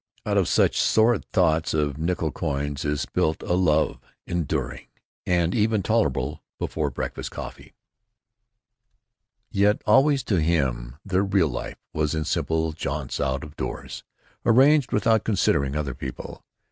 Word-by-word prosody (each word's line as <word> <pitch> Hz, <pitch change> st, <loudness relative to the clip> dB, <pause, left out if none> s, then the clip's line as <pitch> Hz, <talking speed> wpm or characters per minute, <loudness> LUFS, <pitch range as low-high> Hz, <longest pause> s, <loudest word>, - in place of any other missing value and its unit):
(Out -, -, 0 dB
of -, -, +3 dB
such -, -, +3 dB
sordid 115 Hz, +2 st, +3 dB
thoughts 80 Hz, -5 st, +2 dB
of 75 Hz, -2 st, -1 dB
nickel 80 Hz, -1 st, -1 dB
coins 70 Hz, +1 st, -3 dB
is 75 Hz, -1 st, -1 dB
built 80 Hz, -, -1 dB
a -, -, -1 dB
love 80 Hz, -7 st, +2 dB, 0.3 s
enduring, 70 Hz, -6 st, -3 dB, 0.4 s
and 85 Hz, -1 st, +2 dB
even 110 Hz, -2 st, +1 dB
tolerable 75 Hz, -, 0 dB, 0.2 s
before -, -, -2 dB
breakfast -, -, -5 dB
coffee.) -, -, -9 dB, 1.8 s
Yet 105 Hz, +2 st, +2 dB
always 135 Hz, 0 st, +4 dB
to 95 Hz, -8 st, +1 dB
him 65 Hz, -7 st, 0 dB
their 95 Hz, -1 st, +1 dB
real 95 Hz, -5 st, +2 dB
life -, -, -5 dB, 0.2 s
was 75 Hz, 0 st, 0 dB
in 80 Hz, -1 st, -2 dB
simple 80 Hz, +2 st, 0 dB
jaunts 75 Hz, -3 st, -4 dB
out 65 Hz, -1 st, -1 dB
of 75 Hz, 0 st, -10 dB
doors, -, -, -6 dB, 0.4 s
arranged 135 Hz, +3 st, +5 dB
without 110 Hz, +1 st, +2 dB
considering 70 Hz, -9 st, +1 dB
other 75 Hz, -3 st, -2 dB
people. 65 Hz, 0 st, -8 dB
80 Hz, 135 wpm, -24 LUFS, 70-100 Hz, 1.8 s, arranged